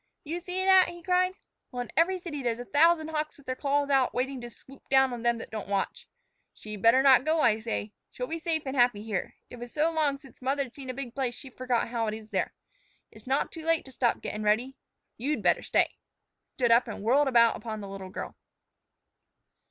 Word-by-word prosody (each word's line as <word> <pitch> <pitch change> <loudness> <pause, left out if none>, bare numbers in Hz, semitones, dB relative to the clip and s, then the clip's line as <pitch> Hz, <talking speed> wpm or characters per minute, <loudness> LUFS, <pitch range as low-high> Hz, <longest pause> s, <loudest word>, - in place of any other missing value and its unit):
"You 325 +3 -4
see 365 +2 -2
that?" 380 -1 +6
he 345 0 -10
cried. 365 +1 +2 0.4
"Well, 245 -1 -3
in - - -13
every 360 +3 +3
city 335 -5 -6
there's 235 -3 -1
a 245 - -7
thousand 315 +3 +3
hawks 310 -1 -3
with 285 - -19
their 255 - -2
claws 285 +1 0
out 265 -2 +3
waiting 260 +1 -2
to 240 - -7
swoop 265 +4 -16
down 265 -1 +4
on 240 - -5
them 235 0 +2
that 225 - -9
don't 215 -3 -5
watch. 200 -1 -2 0.5
She'd 215 -2 -8
better 230 +5 +5
not 265 -2 +7
go, 315 +1 +2
I 220 -4 +3
say. 220 -2 -4 0.2
She'll 250 - -5
be 330 +5 -4
safe 320 -1 -1
and 265 0 -3
happy 245 -5 +3
here. 215 -5 -3 0.2
It 245 - -9
was 240 0 -8
so 315 +2 +1
long 300 -4 +1
since 275 -2 -17
mother'd 265 -1 -1
seen 270 -2 -9
a 255 - -4
big 250 -3 -6
place 255 -3 -2
she 265 0 -11
forgot 250 -2 -1
how 230 -2 -1
it 215 - -2
is 220 0 -12
there. - - -1 0.6
It's - - -16
not 270 +2 0
too 325 - -8
late 330 0 +1
to 265 - -12
stop 245 -2 0
gettin' 210 - -4
ready. 225 +6 +1 0.4
You'd 285 +6 -2
better - - +3
stay." - - +2
He - - -46
stood 240 -3 +2
up 235 +2 +5
and 210 -3 -6
whirled 270 +6 +3
about 235 -3 +5
upon 220 -2 -6
the 200 - -7
little 195 -1 -8
girl. - - -6
260 Hz, 230 wpm, -28 LUFS, 235-300 Hz, 0.6 s, not